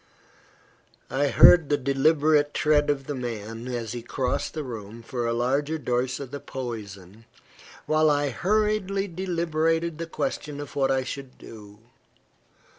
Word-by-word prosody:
I 140 +2 +1
heard 160 +2 +7
the 145 - +3
deliberate 145 +2 +2
tread 150 -1 +3
of 135 -2 0
the 145 - -4
man, 115 -2 -5
as 120 -3 -4
he 120 0 -5
crossed 125 +4 -2
the 155 - -3
room 115 -2 -8
for 120 0 -3
a - - 0
larger 140 +6 0
dose 125 -2 -1
of 135 -3 -7
the 145 - -5
poison, 110 -7 -8 0.6
while 155 0 +3
I 145 -1 +1
hurriedly 200 - 0
deliberated 165 -2 -1
the 165 - -4
question 150 - -4
of 145 -2 -8
what 135 -1 +2
I 135 -1 +1
should 130 0 -7
do. 105 -2 -12
140 Hz, 145 wpm, -25 LUFS, 120-155 Hz, 0.6 s, heard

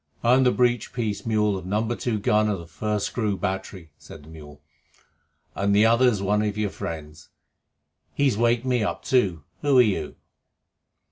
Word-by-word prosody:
"I'm 125 +2 +4
the 125 - +4
breech 120 -2 0
piece 110 -3 -3
mule 105 -2 +1
of 90 -1 -7
number 110 +4 -1
two 120 -3 -2
gun 105 +1 +2
of 100 - -1
the 85 - -10
First 105 +5 -3
Screw 105 -5 -2
Battery," 95 -2 -5
said - - -13
the 75 - -15
mule, 75 -2 -12 0.9
"and 100 +1 0
the 105 +2 +5
other's 115 -3 +3
one 105 +2 +1
of 105 -1 -2
your 105 -2 -1
friends. 80 -1 -8 0.9
He's 135 -6 +2
waked 120 +2 +1
me 125 -2 +1
up 105 - -3
too. 95 - +1 0.2
Who 145 -3 +3
are - - +9
you?" 95 -9 -2
105 Hz, 175 wpm, -24 LUFS, 95-120 Hz, 0.9 s, are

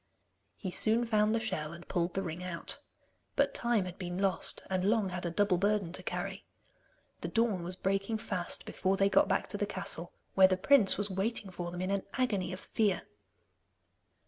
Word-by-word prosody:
He 190 - -4
soon 225 +5 +2
found 215 -1 +3
the - - +2
shell, 155 -8 -3
and 170 +1 -11
pulled 175 -1 -1
the 195 - 0
ring 170 0 -5
out. 175 -2 -3 0.6
But - - +2
time 235 -5 +2
had 180 +1 -8
been 175 -1 -4
lost, 190 -3 0
and 185 -1 0
Long 210 0 +2
had 180 -1 -3
a - - 0
double 185 +1 +2
burden 200 -3 +1
to 185 - -2
carry. 190 +2 -4 0.8
The - - -4
dawn 225 -5 +1
was 175 +2 -4
breaking 195 +4 0
fast 185 -5 -2
before 190 +1 0
they 195 0 +4
got - - +5
back - - +1
to - - -2
the - - 0
castle, - - -3 0.2
where 190 -1 +7
the 185 0 +1
prince 215 0 +5
was 205 0 -1
waiting 195 +1 -2
for 175 -1 -4
them 175 +1 -5
in 185 +1 -1
an 200 -1 +1
agony 210 -9 0
of 185 - -5
fear. 210 -5 0
195 Hz, 200 wpm, -32 LUFS, 180-210 Hz, 0.8 s, where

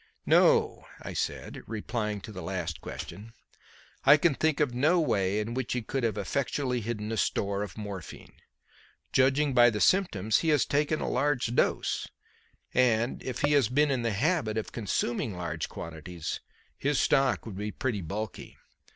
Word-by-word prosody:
"No," - - +4 0.2
I - - -6
said, - - -3
replying 105 -1 -3
to 110 - -9
the 95 -3 -7
last 85 -3 -4
question; 110 +3 -8 0.7
"I 140 +3 +8
can 160 0 +3
think 155 +1 +1
of 145 -5 +1
no 155 +8 +3
way 100 - +1
in 110 +2 -3
which 130 -1 -2
he 125 -2 -2
could 135 +3 -3
have 110 -2 0
effectually 125 +3 -1
hidden 110 -1 -4
a 110 - -2
store 100 -1 0
of 105 - -6
morphine. 100 -4 -8 0.8
Judging 135 +2 +3
by 120 -1 +7
the 105 -2 -3
symptoms, 110 - +3
he 165 - 0
has 150 -4 +4
taken 150 +2 0
a - - -2
large 130 -3 0
dose, - - +1 0.7
and, 120 -1 +2
if 130 - -5
he 145 - +2
has 140 -7 +4
been 145 +3 +3
in 130 -3 0
the 115 -2 0
habit 130 - 0
of 110 - -3
consuming 110 -2 -2
large 85 -2 -3
quantities, 80 0 -6 0.4
his 145 0 +1
stock 135 -2 +2
would 110 -4 -7
be 105 +1 -3
pretty 110 -2 -2
bulky. 100 +5 -6
115 Hz, 170 wpm, -29 LUFS, 105-135 Hz, 0.8 s, I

